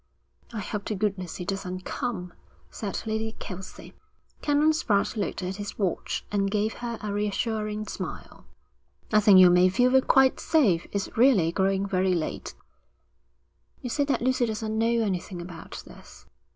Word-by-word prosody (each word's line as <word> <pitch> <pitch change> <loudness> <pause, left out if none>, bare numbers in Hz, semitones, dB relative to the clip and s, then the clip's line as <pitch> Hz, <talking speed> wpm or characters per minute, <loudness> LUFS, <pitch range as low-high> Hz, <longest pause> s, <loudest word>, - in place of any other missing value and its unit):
'I 220 -3 -4
hope 205 +1 -5
to 215 - -2
goodness 190 -3 -2
he 180 - -6
doesn't 185 -1 -4
come,' 195 -9 -4 0.4
said 200 -3 -4
Lady 220 0 -2
Kelsey. 190 -3 -9 0.5
Canon 295 +1 +3
Spratte 210 -11 +1
looked 205 -3 -3
at 185 +2 -4
his 205 -1 -6
watch 190 -5 -2
and 200 -1 +1
gave 215 +2 0
her 235 -1 -3
a 210 -1 -3
reassuring 210 +1 -2
smile. - - -7 0.7
'I 215 - +7
think 205 -2 +7
you 180 -1 +8
may 180 +1 +5
feel 250 +7 +4
quite 265 0 +4
safe. 210 - +2
It's 200 -1 -3
really 225 -9 +4
growing 195 +1 +1
very 185 -1 +1
late.' 160 -2 -4 1.3
'You 250 - -4
say 285 - +1
that 270 -5 0
Lucy 255 -1 +2
doesn't 220 0 -3
know 225 +1 +2 0.2
anything 185 -2 -3
about 175 -1 -9
this?' - - -15
205 Hz, 155 wpm, -26 LUFS, 185-225 Hz, 1.3 s, you